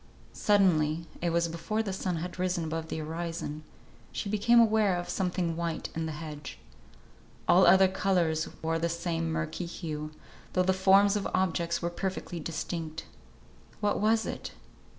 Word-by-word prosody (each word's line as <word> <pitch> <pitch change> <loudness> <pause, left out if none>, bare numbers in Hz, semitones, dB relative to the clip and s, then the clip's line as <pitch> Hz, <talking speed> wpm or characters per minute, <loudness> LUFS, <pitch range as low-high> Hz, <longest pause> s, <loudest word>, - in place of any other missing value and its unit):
Suddenly 170 -6 +3 0.2
(it 175 - +1
was 170 0 +2
before 170 +7 -2
the 195 -3 -3
sun 185 -1 -2
had 175 +2 -5
risen 180 -1 0
above 160 0 -3
the - - -4
horizon) 160 -1 -4 0.5
she 200 - -4
became 235 +3 +5
aware 215 -4 +4
of 175 - -4
something 180 -3 -1
white 170 -1 -3
in 160 0 -2
the - - -3
hedge. 150 -1 -7 0.9
All 185 +1 +6
other 190 0 +7
colours 180 -4 +1 0.2
wore 165 0 0
the 170 +1 0
same 165 -1 -2
murky 165 +2 -3
hue, 155 -3 -5 0.4
though 185 - +3
the 190 +1 +3
forms 195 +2 +5
of 205 - -1
objects 170 -2 0
were 170 - 0
perfectly 185 -1 -4
distinct. 160 0 -4 0.7
What 205 -1 +1
was 220 +2 +3
it? - - -5
170 Hz, 155 wpm, -29 LUFS, 165-190 Hz, 0.9 s, other